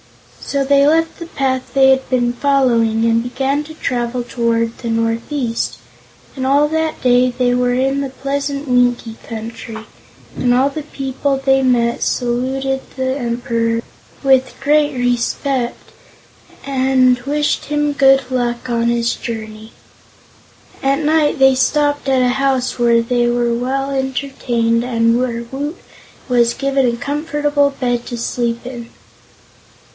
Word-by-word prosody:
So 280 -1 -2
they 280 +1 +4
left 325 +2 +1
the 335 - -7
path 265 -5 -2
they 265 -1 +6
had 265 0 +1
been 245 -2 +1
following 240 -5 +2
and 230 0 +3
began 270 +4 -1
to 315 +1 -11
travel 245 -3 -2
toward 230 -1 -1
the 235 - -4
northeast, 230 +2 -1 0.6
and 260 -1 -3
all 285 +2 +3
that 320 0 -2
day 250 0 +4
they 245 0 0
were 245 0 +1
in 270 +2 +1
the 275 - -3
pleasant 280 +2 -3
Winkie 245 -2 +1
Country, 225 0 -7 0.5
and 245 -1 +1
all 265 +3 +3
the 310 +2 -5
people 275 -1 -2
they 270 0 +2
met 240 -2 +1
saluted 265 +2 -1 0.2
the 260 0 -1
Emperor 235 -2 -1 0.4
with 265 -1 +3
great 295 0 +2
respect 245 +1 -1 0.7
and 260 -2 +2
wished 295 +3 -1
him 295 0 0
good 270 -1 +5
luck 240 -1 -1
on 235 -1 0
his 235 0 +1
journey. 220 -1 -7 1.1
At 275 +1 +1
night 305 -1 +2
they 265 0 +5
stopped 290 +2 +1
at 260 -1 +3
a 250 - +3
house 265 -1 0
where 235 -1 +3
they 240 0 +1
were 240 0 +1
well 270 +3 -2
entertained 260 -4 -1
and 230 -1 +2
where 235 -2 -2
Woot 290 +5 -4 0.5
was 235 -2 +2
given 275 -1 +1
a 235 0 -1
comfortable 290 +1 0
bed 245 -3 -2
to 240 - -5
sleep 235 0 -2
in. 240 -2 -7
255 Hz, 140 wpm, -17 LUFS, 235-275 Hz, 1.1 s, they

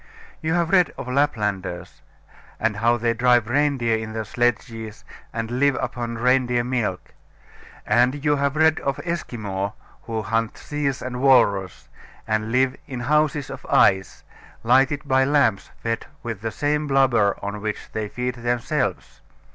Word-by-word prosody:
You 160 +1 0
have 170 0 0
read 180 -3 +4
of - - -6
Laplanders, 105 -10 -1 0.6
and 110 -2 0
how 115 +2 +3
they 115 0 +1
drive 120 -2 +3
reindeer 130 -3 +1
in 110 0 -5
their 110 0 -3
sledges, 115 -1 -2 0.3
and 115 0 -4
live 140 0 +3
upon 120 -1 -4
reindeer 125 0 +2
milk; 120 -7 -3 0.7
and 125 +6 +2
you 145 0 +3
have 140 0 0
read 160 0 +4
of 140 0 -2
Esquimaux, 105 - -3 0.3
who 110 -2 -2
hunt 115 0 -1
seals 145 -2 -3
and 125 0 -4
walrus, 100 - +3 0.4
and 110 0 -1
live 130 +2 +2
in 125 -2 -5
houses 150 +1 +1
of - - -8
ice, 95 0 +3 0.4
lighted 135 +4 +3
by 130 0 +4
lamps 135 -8 +2
fed 115 0 -2 0.2
with 115 -4 -5
the 115 - -2
same 150 +5 -1
blubber 125 -7 +3
on 100 +1 -4
which 105 0 -5
they 110 -1 -3
feed 125 +2 -3
themselves. 120 -9 -2
120 Hz, 145 wpm, -23 LUFS, 110-140 Hz, 0.7 s, read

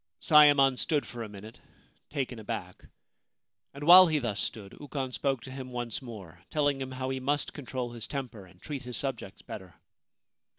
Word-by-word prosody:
Sayemon 145 -4 +6
stood 150 -3 0
for 120 - -8
a 110 - -5
minute 105 +3 -11 0.5
taken 130 -5 -3
aback, 105 -5 -6 0.9
and 140 +1 -9
while 180 +3 +10
he 155 -2 +1
thus 115 -7 -2
stood 100 -3 -4
Ukon 140 -3 -4
spoke 135 -1 -1
to 130 - -9
him 130 -1 -7
once 120 -1 -4
more, 100 -9 -10
telling 145 -2 +1
him 130 - -4
how 130 0 -3
he 130 - -2
must 145 +3 -1
control 125 -3 -5
his 115 -2 -6
temper 120 -9 -6
and 90 0 -20
treat 140 +3 -6
his 125 -2 -5
subjects 120 -8 -4
better. 95 -3 -9
130 Hz, 175 wpm, -29 LUFS, 110-140 Hz, 0.9 s, while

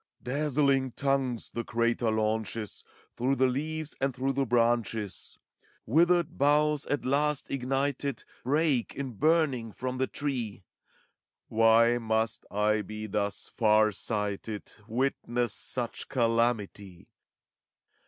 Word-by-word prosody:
Dazzling 135 -1 +1
tongues 135 -4 -1
the 120 - -3
crater 115 0 0
launches 110 -1 -2 0.3
Through 130 +3 +1
the 130 - +3
leaves 155 +4 -2
and 135 -2 0
through 135 +2 -1
the 135 0 0
branches; 115 -4 0 0.5
Withered 170 +5 +2
boughs, 150 +1 +3
at 145 - -1
last 145 +2 +1
ignited. 135 0 -1 0.2
Break, 145 -2 +1
in 135 -2 -4
burning, 140 -3 +1
from 130 +3 -4
the 130 - +1
tree: 120 -9 -4 0.9
Why 115 +2 +5
must 110 -1 -1
I 105 +1 +1
be 105 +2 -6
thus 100 -1 -1
far 110 -1 +3
sighted 105 0 -3
f - - -11
Witness 120 -1 0
such 120 -2 -2
calamity? 115 -6 0
120 Hz, 115 wpm, -29 LUFS, 110-140 Hz, 0.9 s, Why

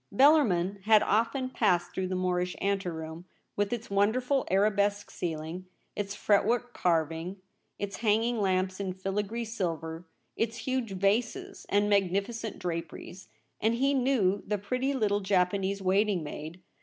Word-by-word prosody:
Bellarmin 200 - +4
had 215 -1 +6
often 245 +5 +1
passed 175 -7 +1
through 190 -1 -2
the 185 - -2
Moorish 180 0 0
anteroom, 175 -4 -3 0.3
with 205 0 0
its 230 -3 -4
wonderful 245 +7 +2
ara 200 +3 +4
besque 205 0 0
ceiling, 165 +2 -4 0.3
its 200 -1 -3
fretwork 235 +5 +2
carving, 165 +2 0 0.4
its 205 0 -4
hang 220 0 +2
ing 235 -2 0
lamps 185 -1 0
in 190 -2 -2
filigree 205 +5 -3
silver, 165 -6 -4 0.3
its 225 0 -1
huge 240 -2 -2
vases 200 +5 -1
and 205 +1 +3
magnificent 200 +3 0
draperies; 175 +1 -6 0.3
and 225 +2 +2
he 275 +3 +2
knew 245 -8 +2
the 210 +1 0
pretty 255 +7 -1
little 205 -5 +1
Japanese 195 0 +1
waiting 195 -1 +2
maid. 155 +4 -7
200 Hz, 140 wpm, -29 LUFS, 185-225 Hz, 0.4 s, had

